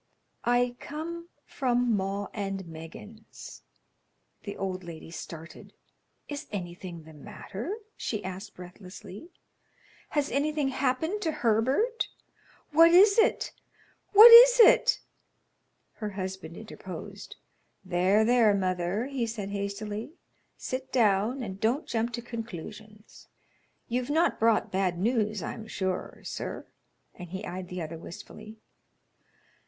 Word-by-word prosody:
"I 245 0 +2
come 335 +3 -6 0.2
from 245 -3 +1
'Maw 195 +1 -2
and 195 -2 -4
Meggins.'" 170 +7 -11 0.8
The 200 - -7
old 185 -1 -3
lady 165 -1 -9
started. 165 -1 -9 0.5
"Is 290 -1 -6
anything 175 -3 -6
the 160 0 -14
matter?" 215 - -7 0.2
she 215 - -4
asked, 190 +2 -7
breathlessly. 185 - -11 0.8
"Has 295 -1 -1
anything 295 0 0
happened 275 +9 -1
to 325 - 0
Herbert? 260 - +1 0.6
What 330 +2 +7
is 400 +5 +6
it? 445 - +2 0.6
What 435 +3 +11
is - - +10
it?" - - +6 1.0
Her 215 -2 -4
husband 190 -4 -6
interposed. 200 -2 -9 0.5
"There, 185 +4 +3
there, 230 -3 +4
mother," 185 +3 -1
he 265 -4 -2
said, 210 -3 -5
hastily. 205 +5 -4 0.4
"Sit 260 +1 -5
down, 225 +2 +2
and 195 -3 -6
don't 240 +9 0
jump 230 +1 -1
to 235 0 -4
conclusions. 215 -2 -9 0.6
You've 245 +1 -2
not 325 +4 +2
brought 225 -1 +2
bad 185 -2 0
news, 215 -1 0
I'm 220 +5 -6
sure, 190 -3 -3
sir;" - - -5 0.5
and 180 -2 -10
he 190 +4 -6
eyed 180 +1 -6
the 180 -1 -5
other 160 +1 -7
wistfully. 215 +5 -11
215 Hz, 115 wpm, -28 LUFS, 190-255 Hz, 1.0 s, What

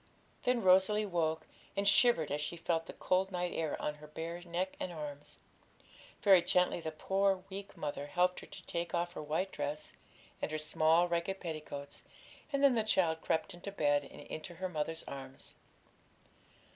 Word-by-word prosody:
Then 245 -3 +2
Rosalie 190 +3 +5
woke, 160 -4 0 0.3
and 200 0 +1
shivered 200 - +5
as 145 +1 0
she 150 +3 -3
felt 165 0 0
the - - -7
cold 190 +1 +1
night 180 -1 -1
air 160 -2 -1
on 150 - -1
her 150 0 -13
bare 165 +3 -5
neck 180 +2 -2
and 185 - -3
arms. 150 -3 -7 0.9
Very 195 -3 +8
gently 180 0 +2
the 160 - -3
poor 195 +3 +1
weak 200 +1 -7
mother 145 -1 -3
helped 180 +4 +2
her - - -11
to - - -10
take 170 +1 -2
off 175 0 -1
her - - -5
white 160 +6 -1
dress 145 +1 -4 0.5
and - - -1
her 155 - -2
small 160 +2 +4
ragged 175 +3 -1
petticoats; 155 -4 -6 0.5
and 280 -1 +1
then 275 -2 +7
the 230 - +3
child 170 -7 +2
crept 165 +4 0
into 175 +3 -7
bed 145 -6 +2
and - - -11
into 170 +3 -7
her 185 +2 -3
mother's 160 0 -2
arms. 135 -1 -7
170 Hz, 175 wpm, -34 LUFS, 155-190 Hz, 0.9 s, Very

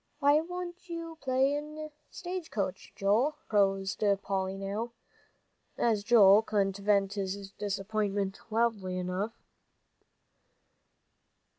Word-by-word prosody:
"Why 285 0 +5
don't 355 +2 -5
you 330 -1 -6
play 270 +2 +2 0.5
stage 360 -2 -5
coach, 195 -3 -3
Joel?" 225 +10 +2
proposed 195 -1 +1 0.2
Polly 190 -1 -1
now, 205 +4 -4 0.8
as 220 -4 +2
Joel 210 -3 +7
couldn't 200 -3 0
vent 200 -1 +2
his 195 0 -4
disappointment 200 -1 -2
loudly 215 -5 0
enough. 185 +5 -2
210 Hz, 95 wpm, -30 LUFS, 195-265 Hz, 0.8 s, Joel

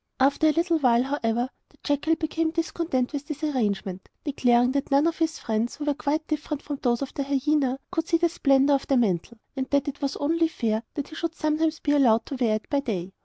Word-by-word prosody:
After 280 +4 +3
a - - +5
little 335 +1 +1
while, 245 -3 +4
however, 245 -3 -1 0.2
the - - -26
jackal 290 +2 +1
became 320 0 -1
discontented 325 -5 -1
with 285 0 -4
this 305 -1 -6
arrangement, 205 -9 -2
declaring 245 -3 +3
that 280 0 -1
none 280 +2 +4
of 335 0 0
his 325 0 0
friends, 225 +1 -2
who 295 - -5
were 295 - +2
quite 295 +2 -1
different 300 -1 -3
from 285 -2 -5
those 240 0 +1
of 270 - -7
the - - -3
hyena, 275 -1 +1
could 325 -2 -1
see 335 - +3
the 340 +1 +3
splendour 275 -3 +3
of 270 - -12
the 270 - +3
mantle, 220 0 0 0.2
and 265 -1 -3
that 280 -1 +1
it 285 0 -5
was 280 0 -1
only 330 +3 +2
fair 225 -8 -1
that 290 - -4
he - - -12
should 330 0 -3
sometimes 310 0 0
be 290 - 0
allowed 245 -6 +4
to 275 - -5
wear 235 -4 +1
it 215 - -5
by 285 - +1
day. 195 -9 -4
280 Hz, 230 wpm, -25 LUFS, 245-310 Hz, 0.2 s, a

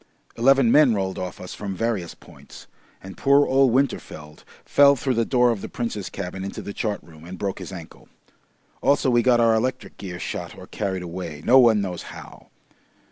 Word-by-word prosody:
Eleven 135 0 +4
men 145 -6 +5
rolled 95 -1 -3
off 90 -1 -6
us 90 - -8
from 100 -2 -6
various 105 -5 -2
points, - - -15 0.4
and 95 0 -11
poor 140 +1 +4
old 135 -1 +3
Winterfeld 80 - -2 0.2
fell 140 0 +5
through 130 0 -1
the 115 -1 0
door 125 -1 +3
of 110 -4 -4
the - - -7
Prince's 115 -5 -4
cabin 95 -1 -6
into 100 - -6
the 100 - -7
chart 105 -1 -2
room 80 -1 -16
and 90 +2 -9
broke 100 0 -4
his - - -8
ankle. 85 -4 -11 0.7
Also 140 -1 +2
we 120 0 +4
got 120 0 +3
our 115 -1 +4
electric 125 +4 -2
gear 90 -3 -7
shot - - -6
or - - -10
carried 95 -3 -4
away 85 -4 -7
no 130 +3 +6
one 115 -4 +5
knows 90 -3 -4
how. - - -12
105 Hz, 190 wpm, -23 LUFS, 95-125 Hz, 0.7 s, no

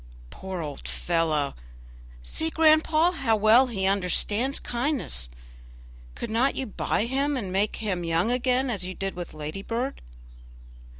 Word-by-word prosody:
"Poor 190 -2 -6
old 145 -3 -6
fellow! 160 -4 0 0.7
see, 320 - -1
grandpapa, 320 +2 +4
how 225 -7 +2
well 220 +5 +5
he 195 -6 -2
understands 200 +7 +1
kindness. 240 - -2 0.9
Could 225 - -5
not 245 +5 +2
you 265 - -2
buy 215 0 -1
him 275 +3 0
and 195 -7 -4
make 200 +2 +1
him 190 -5 -2
young 165 +6 +1
again 250 +1 +1
as 200 -5 0
you 185 0 -5
did 195 0 -3
with 175 -2 -7
Ladybird?" 195 - -4
215 Hz, 135 wpm, -26 LUFS, 180-265 Hz, 0.9 s, well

